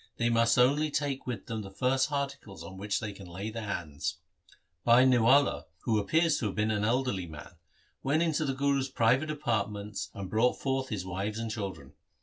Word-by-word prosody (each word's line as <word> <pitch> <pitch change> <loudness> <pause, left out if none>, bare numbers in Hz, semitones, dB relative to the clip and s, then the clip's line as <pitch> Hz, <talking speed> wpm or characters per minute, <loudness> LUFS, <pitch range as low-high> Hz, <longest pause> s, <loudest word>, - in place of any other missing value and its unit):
They 120 0 +2
must 115 0 +3
only 145 +5 +4
take 140 -2 -2
with 120 -6 -4
them 110 -1 -4
the 100 - -8
first 130 +8 +1
articles 140 -8 -4
on 90 +3 -9
which 100 +1 -2
they 110 -3 -5
can 95 -2 -11
lay 95 +5 -5
their 110 0 -5
hands.' 75 -4 -3 0.7
Bhai 120 +2 +6
Niwala, 125 - +4 0.2
who 110 -3 +1
appears 160 +9 +2
to 110 - -1
have 95 - -4
been 105 +1 +1
an 105 -1 0
elderly 115 -5 0
man, 80 -1 -10 0.5
went 150 +5 +2
into 160 -2 +1
the 135 -3 -1
Guru's 140 -1 +1
private 130 +5 +2
apartments 105 -8 -2
and 100 -1 -5
brought 110 +6 +3
forth 135 -1 -1
his 100 -5 -3
wives 95 +4 -3
and 115 -1 -3
children. 100 -3 -6
115 Hz, 190 wpm, -30 LUFS, 100-135 Hz, 0.7 s, Bhai